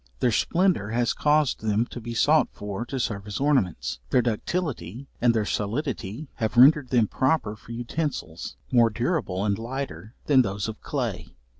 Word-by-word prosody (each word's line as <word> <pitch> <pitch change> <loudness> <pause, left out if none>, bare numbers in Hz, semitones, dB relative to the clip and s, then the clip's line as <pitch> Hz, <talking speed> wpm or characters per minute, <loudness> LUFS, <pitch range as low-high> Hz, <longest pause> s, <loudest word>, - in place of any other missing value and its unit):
Their 125 - +2
splendor 170 - +1
has 120 +1 +1
caused 150 -2 +2
them 110 +1 +1
to 120 - -7
be 120 +1 -6
sought 150 +7 +4
for, 105 +3 -5
to 135 - -3
serve 105 -4 -3
as 105 -1 -4
ornaments; 130 - 0
their 125 -2 +3
ductility 120 - -3 0.2
and 120 0 +5
their 110 -2 0
solidity 110 - -3
have 110 +1 -2
rendered 140 +2 +7
them 120 -4 +3
proper 130 -5 0
for 110 - -14
utensils, 120 - -4 0.2
more 120 -2 +5
durable 115 - -1
and 100 0 0
lighter 115 -5 -6
than 135 -3 +5
those 100 -2 -2
of 110 -1 -7
clay. - - -3
120 Hz, 165 wpm, -25 LUFS, 105-140 Hz, 0.2 s, rendered